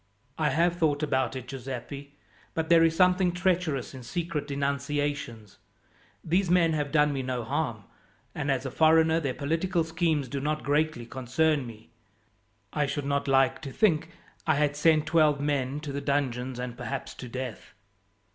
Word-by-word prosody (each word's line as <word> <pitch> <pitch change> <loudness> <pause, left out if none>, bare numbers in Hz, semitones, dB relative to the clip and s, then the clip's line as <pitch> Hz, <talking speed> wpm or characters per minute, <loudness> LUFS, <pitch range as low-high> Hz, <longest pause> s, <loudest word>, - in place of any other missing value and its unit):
"I 155 - +2
have 170 +2 +2
thought 150 -3 +1
about 130 -4 0
it, 130 -1 -6
Giuseppi, 135 +2 -7 0.4
but 160 -1 -1
there 165 -1 +7
is 165 0 +3
something 180 0 +4
treacherous 175 -8 0
in 130 - -8
secret 155 +2 -3
denunciations. 140 -5 -3 0.6
These 180 +3 +1
men 170 -2 +4
have 145 -2 -1
done 150 -2 +3
me 135 - -2
no 125 -2 -3
harm, - - -2 0.5
and 145 -1 -3
as 135 -1 0
a 135 - -3
foreigner 160 +1 +4
their 140 -5 -2
political 165 +4 0
schemes 160 -3 0
do 140 +3 -3
not 150 +2 -2
greatly 145 -4 0
concern 130 +3 0
me. 110 -1 -12 0.8
I 150 -1 +1
should 145 0 -3
not 140 0 0
like 135 -1 +3
to 140 -4 -6
think 165 -3 +2 0.4
I 155 - +4
had 145 0 +1
sent 155 0 +3
twelve 155 -3 +3
men 140 -1 -1
to 150 -2 -5
the 140 +1 -3
dungeons 130 -3 -1
and 125 -1 -5
perhaps 135 +1 -5
to 125 - -9
death." 125 -3 -6
145 Hz, 165 wpm, -28 LUFS, 135-160 Hz, 0.8 s, there